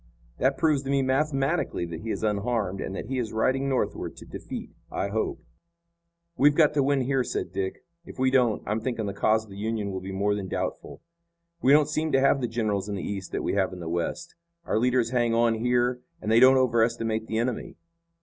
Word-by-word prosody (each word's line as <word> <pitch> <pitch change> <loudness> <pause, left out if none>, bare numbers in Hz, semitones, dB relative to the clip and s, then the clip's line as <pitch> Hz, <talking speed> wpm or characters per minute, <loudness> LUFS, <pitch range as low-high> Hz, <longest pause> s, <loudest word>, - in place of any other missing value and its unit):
That 135 0 +2
proves 155 -3 +2
to 135 - -7
me 140 -1 +2
mathematically 135 - 0
that 85 -1 -6
he 115 - -6
is - - -3
unharmed 105 -2 -1
and 95 - -4
that - - -5
he 130 +3 -2
is 115 -3 -3
riding 130 +5 +1
northward 130 - -2
to - - -11
defeat, - - -7 0.2
I 100 - -2
hope." 110 +2 -2 0.9
"We've 145 0 +4
got 150 -2 +4
to 145 - +2
win 140 0 +2
here," 130 0 +1
said - - -3
Dick. 95 -1 -3 0.2
"If - - -12
we 130 0 +2
don't, 125 -5 +2
I'm 105 +2 -1
thinking 115 -2 -2
the 100 - -3
cause 110 +2 +2
of 110 - -16
the 95 - -9
Union 110 -1 -2
will 95 -1 -4
be 95 +1 -6
more 100 +2 +1
than 100 -2 -3
doubtful. - - -4 0.6
We 130 - +4
don't 150 0 +6
seem 155 +1 -1
to 135 - +5
have 135 0 +3
the 120 - 0
generals 105 -4 -1
in 100 - -2
the 95 - -4
East 95 -2 -5
that - - -2
we - - -1
have 95 -2 +1
in 90 - -8
the 85 - -6
West. 85 - -3 0.3
Our - - +1
leaders 125 -1 +2
hang 120 -2 +2
on 115 0 +3
here 125 0 +1 0.2
and 110 - -3
they 115 - +6
don't 130 +1 +7
overestimate 115 -2 +1
the 110 - -2
enemy." 120 0 -2
115 Hz, 225 wpm, -26 LUFS, 105-135 Hz, 0.9 s, don't